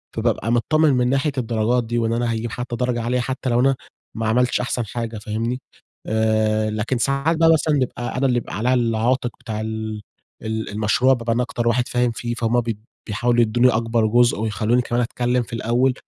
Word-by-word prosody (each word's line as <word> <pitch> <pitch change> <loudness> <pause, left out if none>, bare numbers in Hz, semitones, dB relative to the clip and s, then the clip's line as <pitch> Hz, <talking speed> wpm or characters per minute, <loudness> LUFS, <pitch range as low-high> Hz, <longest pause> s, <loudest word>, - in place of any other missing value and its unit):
فبابقى 115 - 0
متطمن 150 +5 +3
من 125 -1 +2
ناحية 140 +3 +1
الدرجات 120 0 +1
دي 120 +1 -3
وإن 115 -1 +1
أنا 120 0 0
هاجيب 115 0 -3
حتى 120 +1 -4
درجة 125 0 -1
عالية 120 +2 0
حتى 130 +1 -3
لو 120 - +2
أنا 135 +2 +3 0.4
ما 115 - -1
عملتش 125 +3 +2
أحسن 125 -1 -2
حاجة، 115 +1 -5
فاهمني؟ 115 +4 -3 0.5
آآ 110 0 +1
لكن 110 +4 -1
ساعات 140 +6 +1
بقى 165 0 +5
مثلًا 155 -1 +1
نبقى 125 -2 -2
أنا 135 - +1
اللي 125 -2 +2
يبقى 120 - -4
عليَّ 125 +4 +1
العاتق 120 +1 +1
بتاع 110 -4 -5
ال 110 -1 -4 0.4
ال 110 0 -3
المشروع، 110 +5 +2
بابقى 115 -2 -1
أنا 125 +2 +1
أكتر 120 -1 -3
واحد 120 +1 +2
فاهم 125 -1 +1
فيه، 120 +1 -4
فهُم 120 +1 +1
بيد 110 -2 -5 0.2
بيحاولوا 120 +3 +1
يدوني 120 +2 +3
أكبر 115 -1 +1
جزء 120 0 +3
ويخلّوني 110 +3 +1
كمان 120 0 -1
أتكلم 120 +1 0
في - - -12
الأول، 120 +3 +1
120 Hz, 195 wpm, -21 LUFS, 110-125 Hz, 0.5 s, بقى